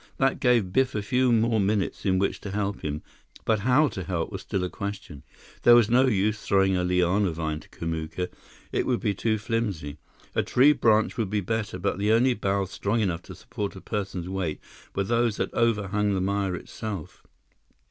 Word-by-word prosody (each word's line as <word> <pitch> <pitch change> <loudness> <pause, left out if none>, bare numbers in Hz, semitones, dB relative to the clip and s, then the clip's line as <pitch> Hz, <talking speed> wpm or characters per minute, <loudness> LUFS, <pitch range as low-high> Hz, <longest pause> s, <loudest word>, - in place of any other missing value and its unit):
That 135 0 +1
gave 115 -8 +2
Biff 130 -2 +2
a 105 - -1
few 125 +3 +2
more 115 -1 +3
minutes 100 0 0
in 95 -1 +3
which 100 +1 0
to 100 - -6
help 100 0 -2
him; 75 0 -4 0.4
but 110 -2 +2
how 130 +8 +4
to 95 - -6
help 85 -3 -2
was - - -5
still 95 - -2
a - - 0
question. 100 -8 -6 0.4
There 120 - +8
was 115 -2 +4
no 130 +2 +5
use 105 -1 +1
throwing 95 -1 +2
a 90 - +1
liana 90 +2 +2
vine 80 -1 -3
to - - -17
Kamuka; 80 +2 -4 0.4
it - - 0
would 125 -2 +1
be 105 -5 0
too 110 +3 0
flimsy. 100 -10 -3 0.3
A - - +2
tree 140 +4 +5
branch 110 -5 +2
would 110 -5 -1
be 105 +1 0
better, 105 0 -2
but 100 +1 -2
the 105 +2 +2
only 125 +3 +4
boughs 100 -3 -1
strong 105 +3 -1
enough 90 -6 0
to - - -11
support 100 -2 -5
a - - -8
person's 95 -4 -4
weight 90 -5 -3 0.4
were 100 - +1
those 115 +1 +1
that - - -2
overhung 105 -3 +1
the 95 - 0
mire 100 -1 0
itself. 100 -2 -7
100 Hz, 200 wpm, -26 LUFS, 95-115 Hz, 0.4 s, There